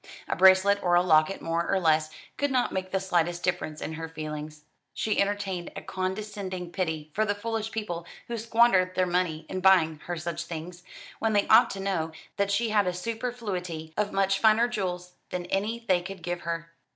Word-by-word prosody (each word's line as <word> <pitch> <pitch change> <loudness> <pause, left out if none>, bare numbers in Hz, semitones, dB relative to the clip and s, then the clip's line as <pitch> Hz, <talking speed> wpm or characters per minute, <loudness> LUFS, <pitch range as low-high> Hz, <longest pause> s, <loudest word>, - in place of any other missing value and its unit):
A - - -1
bracelet 190 +2 +6
or 175 -1 +3
a 175 - +5
locket 160 +1 +3
more 165 +1 -1
or 195 - +2
less 155 -2 +3 0.3
could 285 - 0
not 255 -2 +1
make 185 0 -3
the 190 - 0
slightest 175 -2 0
difference 175 -4 -2
in 160 - -4
her 160 +1 -6
feelings. 155 -1 -6 0.3
She 215 -2 +1
entertained 195 -3 -2
a - - -6
condescending 190 -2 -4
pity 160 -5 -3
for 215 - +2
the 205 -1 0
foolish 225 +1 -3
people 175 -7 -4 0.2
who 235 - -3
squandered 220 -5 +3
their 185 - +3
money 175 -3 -1
in 185 - -4
buying 175 -5 +4
her 175 0 -3
such 170 +1 -4
things, 175 +2 -7 0.4
when 225 0 +1
they 205 -1 +2
ought 230 +3 +7
to 195 - -7
know 185 -5 -1 0.2
that 200 0 +1
she 220 +3 +1
had 205 -3 +3
a 180 - 0
superfluity 185 -7 -4
of 210 -1 0
much 195 0 +2
finer 225 +2 +5
jewels 180 -6 -3 0.2
than 180 -1 -4
any 225 +4 -1
they 185 -3 +3
could 190 -1 -8
give 175 0 -3
her. 165 0 -4
185 Hz, 195 wpm, -27 LUFS, 170-205 Hz, 0.4 s, ought